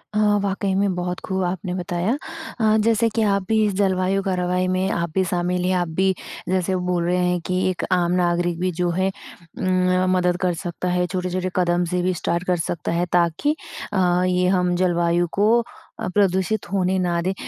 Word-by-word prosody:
हाँ, 210 -1 +3
वाक़ई 195 0 -1
में 195 0 +1
बहुत 180 0 -3
खूब 190 0 -1
आपने 180 0 -3
बताया। 180 +3 -1 0.5
अ, 215 -1 +3
जैसे 230 0 +3
कि 225 - +2
आप 200 -2 +2
भी 220 -1 +3
इस 205 - 0
जलवायु, 190 0 +1
कार्यवाही 180 -1 0
में 185 +1 0
आप 170 -1 -1
भी 190 - +3
शामिल 180 0 0
हैं 185 - +2
आप 175 -1 0
भी 190 0 +3 0.4
जैसे 185 0 +1
बोल 180 -1 -1
रहे 180 +1 +1
हैं 180 0 +1
कि 185 0 0
एक 185 - -3
आम 175 -1 +2
नागरिक 175 -1 +1
भी 185 0 0
जो 175 0 +2
है 185 +2 0 0.5
उम, 185 0 +2
मदद 180 -1 +1
कर 180 -2 +1
सकता 175 +1 -5
है। 180 0 +1
छोटे-छोटे 185 0 -2
कदम 175 -1 +2
से 180 0 +1
भी 185 +1 +1
स्टार्ट 170 0 -2
कर 180 -1 +2
सकता 165 0 -3
है 170 +1 +1
ताकि 175 - +2 0.4
अ, 180 -2 +2
ये 180 0 +2
हम 180 -1 +2
जलवायु 175 -1 +1
को 225 +3 +4 0.4
अ, - - -2
प्रदूषित 195 +1 +1
होने 190 -1 +1
ना 175 -1 0
दें। 190 +2 -1
180 Hz, 195 wpm, -22 LUFS, 175-190 Hz, 0.5 s, को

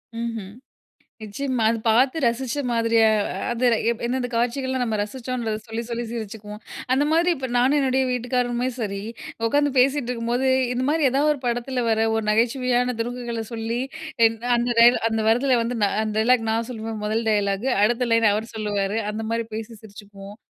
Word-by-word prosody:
ம்ஹ்ம் 230 -4 -4 0.7
நிச்சயமா. 245 +3 -2
அது 230 - -1
பார்த்து 255 +7 +3
ரசிச்ச 240 +3 0
மாதிரியா 230 -1 +3 0.2
அ - - -4 0.2
அது 240 +1 -2 0.4
எந்தெந்த 250 +1 -1
காட்சிகள்லாம் 260 +2 -1
நம்ம 225 -3 -1
ரசிச்சோன்றத 230 0 -3
சொல்லி 225 0 -4
சொல்லி 235 0 -3
சிரிச்சுக்குவோம். 210 -1 -7 0.3
அந்த 270 +3 +3
மாரி 335 +2 +3
இப்போ 260 -1 -4
நானும் 255 +4 +3
என்னோட 265 -2 +1
வீட்டுக்காரருமே 245 0 -1
சரி, 200 -4 -3 0.5
உட்காந்து 290 +4 +2
பேசிட்டு 265 0 +2
இருக்கும்போது, 240 +2 -1 0.3
இந்த 250 +1 -1
மாதிரி 305 -1 +2
ஏதாவது 285 +3 +2
ஒரு 290 - -6
படத்ல 245 +1 -1
வர்ற 225 0 +2
ஒரு 225 -1 -1
நகைச்சுவையான 245 +2 +1
துருக்குகள 240 -1 -3
சொல்லி 230 +1 -3 0.5
எ - - +6 0.3
அந்த 240 +1 0
டயலாக் 235 -1 +6
அந்த 225 0 0
வர்றத்ல 245 +2 +3
வந்து 240 +1 -3 0.3
அந்த 215 -1 -2
டயலாக் 230 0 +3
நான் 225 +1 -1
சொல்லுவேன் 225 -2 -5
மொதல் 220 +2 -1
டயலாக்கு, 205 +2 0
அடுத்த 240 +3 +2
லைன் 230 -1 +4
அவர் 220 +3 -3
சொல்லுவாரு. 210 -1 -1
அந்த 220 +1 -4
மாதிரி 230 0 -1
பேசி 220 +1 -6
சிரிச்சிக்குவோம். 205 -1 -12
235 Hz, 160 wpm, -23 LUFS, 220-250 Hz, 0.7 s, எ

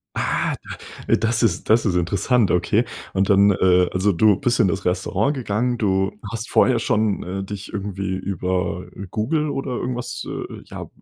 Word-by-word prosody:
Ah, - - 0 0.5
d - - +5
das 115 +1 0
ist 90 -6 0
das 115 +1 +5
ist 100 - +1
interessant, 100 +6 +2
okay. 105 +6 +2 0.3
Und 95 0 +1
dann, 100 +1 +6
äh, 90 -2 +3
also, 95 +2 +2
du 100 +3 +4
bist 120 +5 0
in 100 -5 +4
das 95 - -2
Restaurant 95 +8 0
gegangen. 120 0 -1
Du 95 -1 +1 0.2
hast 115 0 -5
vorher 125 -3 +4
schon, 110 -2 0
äh, 95 +2 -4
dich 100 0 -7
irgendwie 100 -2 -3
über 90 -1 -2 0.2
Google 150 +9 0
oder 135 -2 -3
irgendwas, 125 0 -4
äh, - - -6
ja, - - -8
100 Hz, 170 wpm, -22 LUFS, 95-115 Hz, 0.5 s, dann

